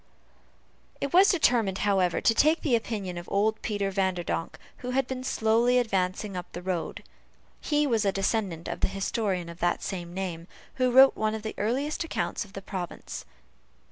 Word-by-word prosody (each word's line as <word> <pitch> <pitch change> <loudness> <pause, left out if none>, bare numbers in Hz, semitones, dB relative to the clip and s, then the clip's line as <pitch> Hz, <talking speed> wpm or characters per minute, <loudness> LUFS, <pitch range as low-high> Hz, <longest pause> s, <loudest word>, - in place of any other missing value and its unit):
It 280 - -3
was 380 +3 +7
determined, 235 - +2
however, 190 -4 +2
to 225 - +4
take 310 +7 +3
the 270 -6 +3
opinion 205 -6 -3
of 175 - -10
old 215 +2 +1
Peter 205 -2 -1
Vanderdonk, 185 -3 -1 0.2
who 250 - -6
was 265 +1 +1
seen 255 -1 -4
slowly 235 +1 +2
advancing 195 -3 0
up 180 -1 -6
the 175 - -6
road. 180 -3 -3 0.6
He 295 -1 +1
was 230 -6 +1
a 200 - +2
descendant 195 -4 -1
of - - -4
the - - +2
historian 195 -2 -2
of 170 0 -10
that 175 0 0
name, 175 -2 -5 0.3
who 255 -1 +3
wrote 265 +2 +7
one 215 0 0
of 220 - -6
the 220 - -4
earliest 270 +10 -1
accounts 330 - -2
of 205 -2 -16
the 195 - -7
province. 185 -3 -6
205 Hz, 175 wpm, -27 LUFS, 185-245 Hz, 0.6 s, was